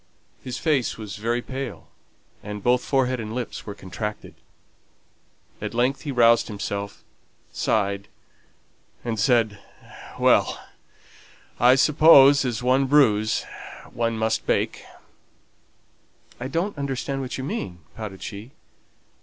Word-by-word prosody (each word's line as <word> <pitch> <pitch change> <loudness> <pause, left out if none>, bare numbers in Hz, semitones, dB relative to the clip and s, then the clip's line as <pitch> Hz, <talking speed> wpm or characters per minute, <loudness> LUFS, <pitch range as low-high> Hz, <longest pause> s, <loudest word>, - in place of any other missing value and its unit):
His 125 -1 -5
face 150 -7 0
was 105 -3 -7
very 120 +3 -1
pale, 130 -4 -6 0.5
and 105 -1 -7
both 125 0 +3
forehead 130 -2 +1
and 110 0 -5
lips 125 -3 -5
were 100 - -6
contracted. 105 +2 -6 1.3
At - - -5
length 125 +3 +1
he 145 - -4
roused 115 -2 +4
himself, 100 -1 -5 0.5
sighed, 100 -2 -1 1.0
and 115 -2 -2
said, 110 -3 +2 0.6
"Well! - - +3 1.0
I 125 +2 +6
suppose 140 -1 +6
as 120 -1 -2
one 130 +2 +3
brews 110 -7 +3 0.5
one 115 -1 -1
must 110 0 -1
bake." - - 0 1.6
"I 125 - -4
don't 170 +9 -2
understand 135 0 -3
what 130 - -5
you 130 - -5
mean," 115 - -5
pouted 105 -4 -7
she. 105 +6 -8
120 Hz, 115 wpm, -24 LUFS, 105-135 Hz, 1.6 s, I